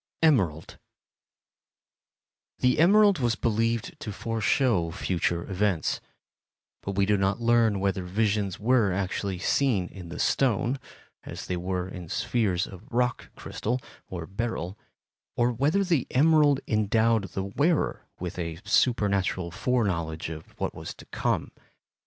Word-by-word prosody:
Emerald 95 - +2 1.8
The 125 +3 +2
emerald 200 +1 +6
was 120 -3 +1
believed 115 0 -1
to 105 - -5
foreshow 115 -3 +1
future 85 0 -1
events, 95 -3 0 0.8
but 100 - -4
we 100 0 +2
do 105 0 +2
not 95 +2 +1
learn 115 -3 +3
whether 95 -1 0
visions 100 0 0
were 115 -3 +3
actually 95 0 -2
seen 100 -1 +1
in 90 -3 -10
the 85 - -7
stone, 130 +1 +1 0.4
as - - -7
they 90 - -2
were 90 +1 -2
in 90 -3 -8
spheres 100 -5 0
of 100 +6 -12
rock 125 +1 0
crystal 120 +4 -3 0.3
or 85 -3 -5
beryl, 100 -2 -3 0.6
or 120 0 +2
whether 145 - +2
the 170 -9 +1
emerald 145 0 +4
endowed 110 0 +2
the 95 - -1
wearer 145 - 0
with 90 0 -5
a 85 -1 -3
supernatural 100 -7 +1
fore 125 +7 +1
knowledge 85 -4 -2
of 80 -1 -10
what - - -2
was - - -7
to - - -14
come. - - -1
105 Hz, 135 wpm, -27 LUFS, 90-125 Hz, 1.8 s, emerald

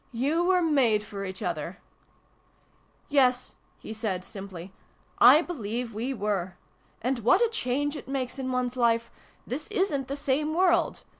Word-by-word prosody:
"You 280 +8 0
were 365 0 +3
made 255 -10 +3
for 200 -2 -7
each 190 0 -6
other! 170 +1 -3 0.4
" - - -38
" - - -37 0.3
Yes," 255 -3 +2 0.2
he 220 - -8
said, 205 -5 -2
simply, 190 -3 -9 0.3
" - - -36 0.2
I 315 - +4
believe 235 -7 -4
we 235 +5 -3
were. 200 -6 -2 0.5
And 255 +1 0
what 230 +2 +4
a - - -1
change 290 - -1
it 285 - -8
makes 265 -1 -3
in 260 -1 -2
one's 250 0 -1
Life! 230 -2 +1 0.3
This 285 +6 -4
isn't 370 - -1
the 275 - -3
same 290 +2 -1
world 350 -1 +2
250 Hz, 165 wpm, -27 LUFS, 210-290 Hz, 0.5 s, I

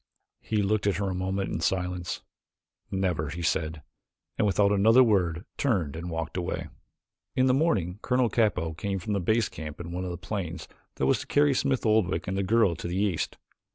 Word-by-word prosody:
He 105 -2 -1
looked 105 0 +1
at 100 - +2
her 100 -1 -1
a - - -2
moment 95 +1 -2
in - - -1
silence. 90 0 -1 0.7
"Never," 90 -6 -1
he 85 +3 -5
said, 80 -1 -1 0.5
and 105 - +2
without 100 0 +3
another 110 +5 +6
word 90 -6 +1
turned 95 - 0
and 85 +2 -5
walked 80 +1 -4
away. 90 - -3 0.7
In 130 - +3
the 130 - +4
morning 105 - +1
Colonel 125 -1 +2
Capell 95 -8 +1
came 100 +2 -2
from 95 +3 -3
the 100 - +1
base 110 +5 +2
camp 75 -1 -8
in 85 0 -6
one 90 +1 -3
of 90 - -3
the 85 - -4
planes 90 -3 -5 0.3
that - - 0
was 65 - +3
to - - -7
carry 145 -1 +4
Smith 135 -1 0
Oldwick 110 -5 +2
and 95 - -1
the 100 - 0
girl 100 -2 +3
to - - -5
the 90 +2 -2
east. 100 -5 0
95 Hz, 200 wpm, -27 LUFS, 85-110 Hz, 0.7 s, another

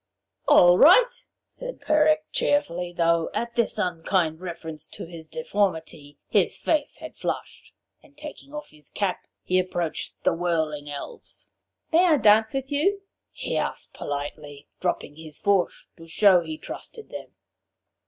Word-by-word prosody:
'All 175 0 +7
right,' - - +6 0.2
said - - -8
Peric 310 0 +3
cheerfully, 180 -11 0
though 170 -1 +2
at 235 0 -2
this 235 -2 +1
unkind 175 -3 0
reference 160 -4 -7
to - - -8
his 165 -1 -11
deformity 160 -9 -2
his - - +2
face 305 -3 0
had - - -9
flushed. - - -5 0.3
And 285 - -23
taking 295 -2 -10
off 300 0 -8
his 150 -1 -13
cap 200 -3 -2 0.2
he 185 0 +2
approached 175 -3 -3
the - - +3
whirling 160 -4 -1
Elves. 145 -1 -9 0.4
'May 340 +3 +6
I 325 -4 +5
dance 220 0 +4
with 270 +1 -3
you?' 390 +8 +1 0.3
he - - -4
asked - - -3
politely, 145 0 -6
dropping 175 -4 -2
his 160 -2 -8
fourche 200 -3 +1
to 165 -1 -13
show 185 +1 +5
he 160 -2 -6
trusted 445 - -8
them. - - -9
180 Hz, 145 wpm, -25 LUFS, -, 0.4 s, All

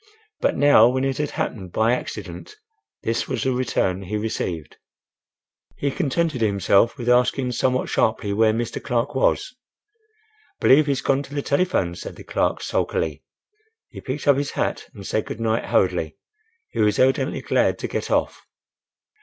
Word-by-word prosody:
But - - +1
now 145 -5 +6
when 130 +1 -1
it 135 0 -2
had 150 -1 -1
happened 95 -6 -4
by 110 +5 +2
accident, 425 - -6 0.5
this 115 +1 -1
was - - -2
the 130 - +1
return 115 -7 0
he 100 +3 -3
received! 90 -7 -4 1.0
He 140 - -1
contented 155 -3 -1
himself 100 +3 +3
with 120 -2 -6
asking 125 +1 +2
somewhat 130 +2 0
sharply 105 -2 0
where 110 +1 +4
Mr. 115 +1 -3
Clark 125 +1 -1
was. 135 - +1 1.0
"Believe 145 +3 +5
he's 140 -1 0
gone 135 0 +1
to 145 +1 -10
the 145 - -1
telephone," 140 - +1
said 90 - -8
the - - -11
clerk, - - -1
sulkily. 75 -2 -1 0.7
He - - -10
picked 135 +3 -5
up 140 -2 +6
his 140 0 -1
hat - - -2
and 100 - -10
said 110 - -1
good - - -6
night 115 0 0
hurriedly. - - 0 0.5
He - - -6
was 105 -1 +3
evidently 130 +1 +2
glad - - +1
to - - -4
get - - -4
off. - - -1
125 Hz, 160 wpm, -23 LUFS, 110-140 Hz, 1.0 s, now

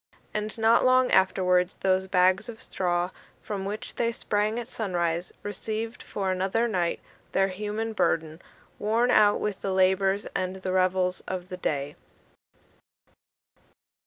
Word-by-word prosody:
And 215 +1 -3
not 225 +1 +4
long 255 0 +4
afterwards, 180 -1 +3
those 190 0 +2
bags 185 +4 +3
of 225 -1 -8
straw, 175 -1 -1 0.3
from 200 -2 -4
which 205 +2 -5
they 235 -1 0
sprang 210 -1 -1
at 240 -1 -4
sunrise, 175 -7 -2
received 220 +3 -4
for 195 -2 -2
another 190 +5 +1
night 180 -6 0 0.3
their 195 0 +3
human 210 +3 -3
burden, 160 -5 0 0.4
worn 230 +4 +2
out 210 -2 +5
with 210 -2 -3
the 195 - -2
labours 190 +1 +2
and 185 0 -1
the 190 -1 -4
revels 185 0 +1
of 185 -1 -4
the 180 - -5
day. 145 -4 -2
190 Hz, 135 wpm, -27 LUFS, 185-215 Hz, 0.4 s, out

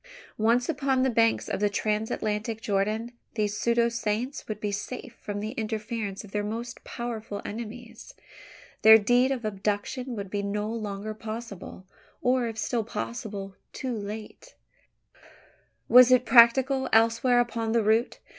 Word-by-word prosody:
Once 235 +3 +3
upon 275 -4 +1
the 265 - +2
banks 230 -1 +2
of - - -2
the 205 0 +2
Transatlantic 215 +1 -2
Jordan, 215 +2 -1 0.2
these 210 -2 0
pseudo 235 +1 +2
saints 235 +3 -3
would 215 -1 -5
be 210 -1 -2
safe 240 +5 -6
from 205 0 -4
the 215 +1 -4
interference 220 -3 -4
of 205 - -13
their 210 0 -1
most 230 +3 -5
powerful 225 -4 -5
enemies. 230 +1 -8 0.7
There 220 0 +10
the 215 - -5
deed 245 +4 +3
of 250 -4 -3
abduction 210 +5 -3
would 200 -3 -6
be 205 - -1
no 205 +1 -2
longer 215 -1 -4
possible; 215 -4 -8 0.3
or, 250 -1 +1
if 225 -1 -6
still 230 +1 -1
possible, 195 - -5 0.2
too 255 -2 -3
late. 215 - -8 1.3
Was 250 +1 +8
it 255 -1 +5
practicable 260 +2 +5
elsewhere 230 +2 +4
upon 230 -2 -1
the 230 -1 +3
route? 220 +3 +2
225 Hz, 145 wpm, -27 LUFS, 210-240 Hz, 1.3 s, There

